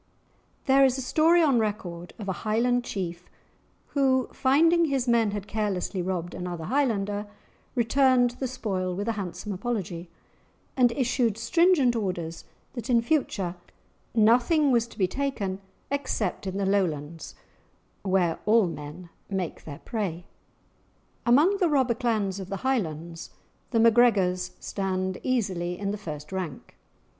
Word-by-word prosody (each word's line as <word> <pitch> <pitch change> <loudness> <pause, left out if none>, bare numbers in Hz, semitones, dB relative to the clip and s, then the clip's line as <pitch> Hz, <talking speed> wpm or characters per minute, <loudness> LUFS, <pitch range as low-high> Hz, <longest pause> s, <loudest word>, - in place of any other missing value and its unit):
There 275 0 +5
is 265 -1 +3
a - - -3
story 330 +6 +4
on 275 -6 +4
record 180 -5 -4
of 210 - -7
a - - 0
Highland 240 +3 +1
chief 175 -5 -5 0.6
who, 260 -3 +2
finding 330 +6 +4
his 270 -4 -1
men 230 -2 +3
had 205 -1 -4
carelessly 205 -3 -2
robbed 175 -1 -3
another 175 -2 -5
Highlander, 205 - 0 0.5
returned 250 +1 +3
the 260 +2 -4
spoil 190 -7 -3
with 205 +4 -3
a - - +2
handsome 205 0 -5
apology, 185 -4 -4 0.7
and 245 -2 +4
issued 240 -4 +1
stringent 290 +1 +3
orders 180 -6 -3 0.3
that 240 0 -6
in 235 -2 +4
future 225 - 0 0.6
nothing 245 +7 +4
was 235 -2 +2
to 235 - -16
be 195 - +3
taken 200 -6 -3 0.3
except 245 -9 -2
in 190 +1 -3
the 200 - 0
Lowlands, 165 -5 -1 0.7
"where 185 -4 +1
all 220 -1 +5
men 165 +1 -7 0.2
make 190 -4 -4
their 145 -2 -8
prey." 185 -6 -3 1.0
Among 305 +12 +5
the 360 -4 +2
robber 265 -5 +3
clans 215 -5 -1
of 190 -1 -7
the 195 - -3
Highlands, 170 - -2 0.4
the 230 - +1
MacGregors 200 -6 +3
stand 190 -1 -2
easily 185 -8 -1
in 200 -1 -2
the - - -2
first 150 -5 -7
rank. 180 -8 -5
210 Hz, 140 wpm, -26 LUFS, 185-250 Hz, 1.0 s, There